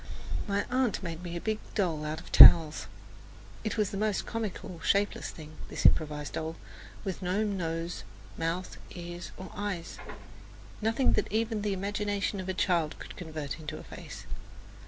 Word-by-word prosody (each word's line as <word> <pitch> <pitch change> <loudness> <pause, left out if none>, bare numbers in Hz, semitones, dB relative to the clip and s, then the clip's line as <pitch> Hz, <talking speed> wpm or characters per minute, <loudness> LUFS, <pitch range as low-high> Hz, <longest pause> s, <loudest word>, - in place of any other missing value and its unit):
My 200 0 0
aunt 250 -5 +1
made 165 -1 -5
me 175 -1 -5
a - - -2
big 215 +3 -1 0.2
doll 165 -7 0
out 155 +1 -3
of - - -13
towels. 160 -3 +9 0.8
It 215 0 -2
was 210 -2 +1
the 195 - -3
most 210 -1 0
comical 205 -6 -4
shapeless 200 +4 +1
thing, 155 -1 -10 0.2
this - - -4
improvised 150 -1 +3
doll, 160 +1 -3 0.5
with 190 -3 -4
no 185 +4 +1
nose, 170 -4 -2 0.3
mouth, 165 +3 -2 0.2
ears 175 0 -7
or 190 - -8
eyes 205 -5 -4 0.8
nothing 225 +4 +3
that - - 0
even 220 0 0
the 205 -1 0
imagination 205 +1 -1
of 190 0 -4
a 190 - -1
child 170 -5 +1
could - - -9
convert 155 -3 -5
into 155 0 -6
a - - -9
face. - - -9
185 Hz, 160 wpm, -30 LUFS, 165-205 Hz, 0.8 s, towels